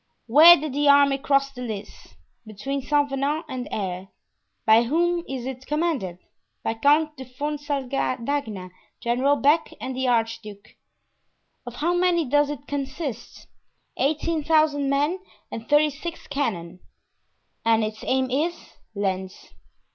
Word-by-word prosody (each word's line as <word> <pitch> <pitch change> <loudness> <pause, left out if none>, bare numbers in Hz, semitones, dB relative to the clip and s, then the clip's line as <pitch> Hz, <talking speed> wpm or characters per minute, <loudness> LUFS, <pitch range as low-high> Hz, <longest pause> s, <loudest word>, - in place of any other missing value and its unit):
"Where 310 +9 +9
did 300 -2 -5
the 290 +1 +2
army 280 -1 +5
cross 275 -1 +1
the 250 -2 -10
Lys?" 215 -4 -8 0.3
"Between 270 +7 -4
Saint 290 +1 +1
Venant 285 +4 -1
and 255 -3 -5
Aire." 190 -2 -4 0.6
"By 220 +1 +6
whom 340 +7 +1
is 260 -2 -4
it 260 0 -7
commanded?" 295 - -1 0.5
"By - - 0
Count 300 +6 +2
de 260 - -7
Fuonsaldagna, 275 -6 -3 0.3
General 255 +4 +2
Beck 295 +3 +2
and 260 0 -5
the 260 0 -1
archduke." 225 -3 -2 1.0
"Of 245 - -7
how 335 +7 0
many 350 -2 +2
does 290 +2 +2
it 285 -1 -6
consist?" 280 -1 -5 0.5
"Eighteen 310 +2 0
thousand 305 -3 +2
men 295 +6 +1 0.3
and 225 0 -7
thirty 300 +1 +4
six 330 +4 -7
cannon." 200 -12 -3 0.8
"And 225 -1 +3
its 215 0 -5
aim 260 -1 0
is?" 320 +6 -2 0.2
"Lens." 190 -1 -4
275 Hz, 130 wpm, -24 LUFS, 235-295 Hz, 1.0 s, Where